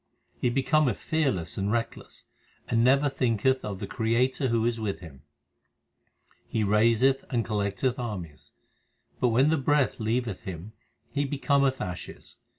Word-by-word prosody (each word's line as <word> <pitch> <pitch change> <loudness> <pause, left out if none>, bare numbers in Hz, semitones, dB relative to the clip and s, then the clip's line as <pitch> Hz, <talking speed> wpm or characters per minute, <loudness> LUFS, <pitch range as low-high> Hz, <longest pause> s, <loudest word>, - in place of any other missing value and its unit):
He 125 - +1
becometh 135 -1 +2
fearless 130 - -1
and 100 +1 0
reckless, 115 0 -4 0.4
And 115 -1 +2
never 135 +3 +4
thinketh 130 -1 +1
of 100 -2 -4
the - - -5
Creator 125 +4 0
who 115 -2 +1
is 120 -1 0
with 105 -3 -3
him. 75 -7 -12 1.3
He 110 - -1
raiseth 115 +6 +3
and 120 -3 0
collecteth 105 +4 -1
armies, 85 - -6 0.7
But 125 - +3
when 130 +6 +3
the 160 - +2
breath 145 -1 +1
leaveth 110 -2 -1
him 95 +3 -8 0.4
he 145 0 +1
becometh 140 -1 +1
ashes. 90 0 -7
115 Hz, 140 wpm, -27 LUFS, 105-135 Hz, 1.3 s, never